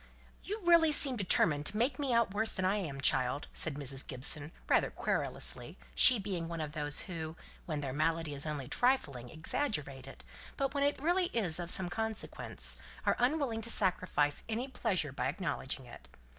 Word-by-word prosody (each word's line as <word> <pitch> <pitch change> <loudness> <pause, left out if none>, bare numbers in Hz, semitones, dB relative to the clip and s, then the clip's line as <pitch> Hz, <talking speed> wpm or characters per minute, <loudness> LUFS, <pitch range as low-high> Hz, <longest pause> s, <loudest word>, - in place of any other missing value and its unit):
"You 425 +2 -5
really 335 -2 +5
seem 280 -3 +5
determined 160 -7 +2
to 210 - -4
make 250 +4 0
me 280 -3 -1
out 230 -4 +2
worse 220 +2 +1
than 185 - -2
I 195 +3 +2
am, 145 -9 -5
child," 130 +1 +2
said 160 -4 0
Mrs. 135 -2 -1
Gibson, 145 +3 +1 0.2
rather - - +3
querulously, - - -3 0.2
she 255 - +7
being 190 -5 -4
one 170 0 -5
of 155 -2 -4
those 150 -1 -3
who, 160 -4 -6 0.3
when 155 -3 -3
their 135 -3 -4
malady 160 +1 0
is 140 +2 -4
only 145 -4 -4
trifling, 140 - 0
exaggerate 150 - -3
it, 135 - -11 0.3
but 275 0 -1
when 280 -1 0
it 285 +1 +2
is 270 - -13
really 355 +2 +2
of 175 -6 0
some 185 0 +5
consequence, 220 +1 -2 0.3
are - - +3
unwilling 250 -3 0
to 230 - -4
sacrifice 180 -8 +2
any 235 +4 -2
pleasures 190 - -2
by 130 - -2
acknowledging 140 -5 -3
it. 120 - -13
175 Hz, 180 wpm, -32 LUFS, 145-235 Hz, 0.3 s, she